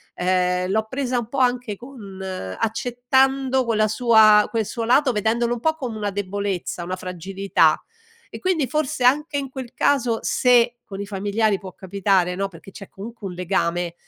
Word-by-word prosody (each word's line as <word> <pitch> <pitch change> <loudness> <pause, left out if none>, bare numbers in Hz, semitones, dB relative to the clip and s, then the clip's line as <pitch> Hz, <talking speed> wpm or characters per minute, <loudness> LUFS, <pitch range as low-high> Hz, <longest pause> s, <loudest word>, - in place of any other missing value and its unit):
ehm, 180 0 +1
l'ho 220 +1 0
presa 260 -1 -1
un 230 - -5
po' 275 - -5
anche 245 -4 +1
con 205 -5 -11
accettando 245 - 0
quella 215 -2 +2
sua 215 -2 +5
quel 225 -2 -1
suo 230 +3 -4
lato, 260 +2 +4
vedendolo 230 +2 0
un 240 - -4
po' 315 +5 +1
come 245 -8 -5
una 205 -1 -2
debolezza, 195 -3 -3
una 185 +2 -3
fragilità 185 -2 0 0.5
e - - -9
quindi 365 -6 +1
forse 300 -4 -1
anche 290 +4 +3
in 275 -2 -3
quel 260 -2 -8
caso, 250 -6 +2
se 240 -1 +3
con 195 -2 -8
i 200 - -4
familiari 205 +1 0
può 185 -2 -10
capitare 190 -1 0
no, 195 +1 -1
perché 190 +1 -14
c'è 195 -1 -11
comunque 215 +1 -8
un 180 - -6
legame, 175 -1 -1
215 Hz, 170 wpm, -22 LUFS, 190-250 Hz, 0.5 s, sua